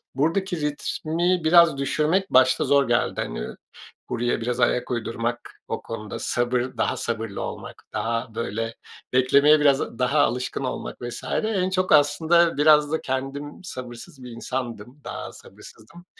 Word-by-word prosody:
Buradaki 170 Hz, +4 st, 0 dB
ritmi 165 Hz, +4 st, -1 dB
biraz 165 Hz, -2 st, +6 dB
düşürmek 155 Hz, +7 st, 0 dB
başta 130 Hz, 0 st, +4 dB
zor 140 Hz, -3 st, +3 dB
geldi. 120 Hz, 0 st, +1 dB
Hani, -, -, -4 dB, 0.6 s
buraya 120 Hz, 0 st, -1 dB
biraz 120 Hz, +1 st, -2 dB
ayak 125 Hz, +1 st, +1 dB
uydurmak, 120 Hz, 0 st, -3 dB, 0.2 s
o -, -, -4 dB
konuda 110 Hz, -2 st, -7 dB
sabır, 120 Hz, 0 st, 0 dB, 0.2 s
daha 130 Hz, -, 0 dB
sabırlı 115 Hz, -4 st, -4 dB
olmak, -, -, -7 dB
daha, 115 Hz, 0 st, -2 dB
böyle, 115 Hz, 0 st, -3 dB, 0.4 s
beklemeye 140 Hz, +4 st, +5 dB
biraz 140 Hz, -5 st, +2 dB
daha 140 Hz, +4 st, +2 dB
alışkın 125 Hz, -1 st, 0 dB
olmak 130 Hz, -, -5 dB
vs. 120 Hz, 0 st, -6 dB, 0.2 s
En 195 Hz, -4 st, 0 dB
çok 185 Hz, 0 st, 0 dB
aslında 160 Hz, +3 st, +4 dB
biraz 150 Hz, 0 st, +5 dB
da 160 Hz, -, -1 dB
kendim 135 Hz, +4 st, -4 dB
sabırsız 130 Hz, 0 st, -9 dB
bir 125 Hz, -, -9 dB
insandım. 120 Hz, +1 st, -6 dB
Daha -, -, -6 dB
sabırsızdım. 170 Hz, +11 st, -15 dB
135 Hz, 135 wpm, -24 LUFS, 120-155 Hz, 0.6 s, biraz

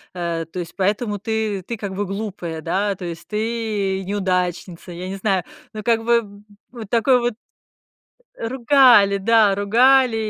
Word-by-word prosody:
а, 170 Hz, -2 st, -3 dB
то 165 Hz, +3 st, -12 dB
есть 175 Hz, -1 st, -7 dB
поэтому 205 Hz, +2 st, -1 dB
ты 215 Hz, -2 st, -2 dB
ты 235 Hz, +6 st, -6 dB
как 200 Hz, -2 st, -5 dB
бы 205 Hz, +2 st, -2 dB
глупая, 190 Hz, -5 st, -5 dB
да, 195 Hz, +5 st, -1 dB
то 185 Hz, -2 st, -8 dB
есть 170 Hz, -1 st, -7 dB
ты- 215 Hz, -3 st, -2 dB
неудачница, 180 Hz, -2 st, -2 dB
я 175 Hz, +2 st, -7 dB
не 195 Hz, -, -4 dB
знаю, 190 Hz, -3 st, 0 dB, 0.3 s
ну, 215 Hz, -, -7 dB
как 225 Hz, 0 st, +1 dB
бы 225 Hz, -4 st, 0 dB, 0.3 s
вот 230 Hz, -5 st, -9 dB
такой 245 Hz, +3 st, +3 dB
вот 240 Hz, 0 st, -1 dB, 1.1 s
Ругали, 240 Hz, -4 st, +4 dB
да, 215 Hz, +1 st, +4 dB
ругали, 245 Hz, +4 st, +4 dB
205 Hz, 150 wpm, -21 LUFS, 190-230 Hz, 1.1 s, Ругали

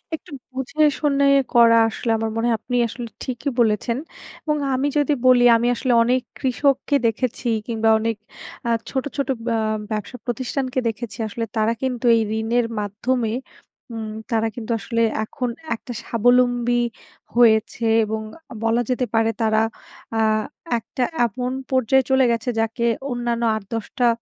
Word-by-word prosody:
একটু 310 Hz, -, -14 dB, 0.2 s
বুঝে 280 Hz, +4 st, -1 dB, 0.2 s
শুনে 280 Hz, -2 st, +2 dB, 0.3 s
করা 230 Hz, -1 st, +7 dB
আসলে 230 Hz, +1 st, -3 dB
আমার 225 Hz, 0 st, -2 dB
মনে 225 Hz, +1 st, 0 dB
হয় 230 Hz, -, +2 dB
আপনি 245 Hz, -, -4 dB
আসলে 235 Hz, +1 st, -6 dB, 0.2 s
ঠিকই 255 Hz, +2 st, -3 dB
বলেছেন 230 Hz, +1 st, +2 dB, 0.5 s
এবং 300 Hz, -1 st, 0 dB, 0.2 s
আমি 265 Hz, +2 st, +1 dB
যদি 295 Hz, 0 st, +2 dB
বলি 250 Hz, -1 st, +6 dB
আমি 235 Hz, +1 st, 0 dB
আসলে 250 Hz, +1 st, 0 dB
অনেক 250 Hz, +2 st, +2 dB, 0.2 s
কৃষককে 275 Hz, +2 st, +1 dB
দেখেছি 240 Hz, +2 st, -2 dB, 0.2 s
কিংবা 225 Hz, -1 st, +1 dB
অনেক 225 Hz, +1 st, -1 dB, 0.5 s
আ -, -, +1 dB, 0.2 s
ছোট, 265 Hz, -1 st, -1 dB
ছোট 280 Hz, -2 st, 0 dB, 0.2 s
ব্য -, -, -1 dB, 0.4 s
ব্যবসা 215 Hz, +4 st, -4 dB
প্রতিষ্ঠানকে 255 Hz, +1 st, -2 dB
দেখেছি 225 Hz, -2 st, -4 dB
আসলে 230 Hz, +2 st, -4 dB
তারা 220 Hz, +1 st, +2 dB
কিন্তু 255 Hz, -2 st, -2 dB
এই 225 Hz, -, +3 dB, 0.2 s
ঋণের 230 Hz, +2 st, +1 dB
মাধ্যমে 220 Hz, +3 st, -1 dB, 0.6 s
উম 220 Hz, -1 st, -5 dB, 0.2 s
তারা 225 Hz, -1 st, +2 dB
কিন্তু 235 Hz, -1 st, -5 dB
আসলে 230 Hz, +1 st, -1 dB, 0.2 s
এখন 250 Hz, +3 st, -3 dB, 0.3 s
একটা 245 Hz, +2 st, -8 dB
স্বাবলম্বী 245 Hz, +1 st, +2 dB, 0.5 s
হয়েছে 230 Hz, -1 st, +3 dB, 0.2 s
এবং 220 Hz, +1 st, -3 dB, 0.3 s
আ -, -, -6 dB
বলা 230 Hz, +1 st, +2 dB
যেতে 250 Hz, 0 st, +1 dB
পারে 225 Hz, 0 st, +3 dB
তারা 220 Hz, 0 st, +3 dB, 0.6 s
আ -, -, +1 dB, 0.6 s
একটা 240 Hz, +2 st, -3 dB, 0.2 s
এমন 250 Hz, +3 st, -3 dB, 0.2 s
পর্যায়ে 260 Hz, +1 st, +3 dB
চলে 265 Hz, 0 st, +4 dB
গেছে 235 Hz, +2 st, -1 dB
যাকে 225 Hz, +1 st, 0 dB, 0.3 s
অন্যান্য 240 Hz, -1 st, -1 dB
৮-১০ 220 Hz, +1 st, -5 dB
টা 245 Hz, -2 st, +4 dB
240 Hz, 150 wpm, -22 LUFS, 225-255 Hz, 0.6 s, করা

